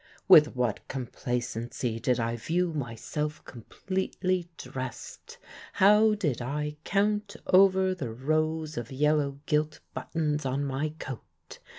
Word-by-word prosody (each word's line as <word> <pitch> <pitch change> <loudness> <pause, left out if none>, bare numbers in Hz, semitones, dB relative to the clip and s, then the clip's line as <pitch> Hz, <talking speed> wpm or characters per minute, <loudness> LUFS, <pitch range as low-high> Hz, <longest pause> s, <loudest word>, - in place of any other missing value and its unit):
With 155 -8 +8
what 125 -4 -1
complacency 120 -2 -3
did 125 +1 +1
I 115 0 -1
view 170 +8 -1
myself 150 +3 -4
completely 185 - -3
dressed! 130 -1 -7 0.4
How 210 +2 +5
did 150 - -1
I 150 +4 -3
count 205 +1 0
over 190 0 +5
the 140 -10 -5
rows 155 +5 -1
of 120 +1 -5
yellow 145 0 +1
gilt 150 0 0
buttons 150 -2 -2
on 135 +2 -1
my 140 +3 -1
coat! 130 -6 -10
150 Hz, 115 wpm, -28 LUFS, 125-180 Hz, 0.4 s, With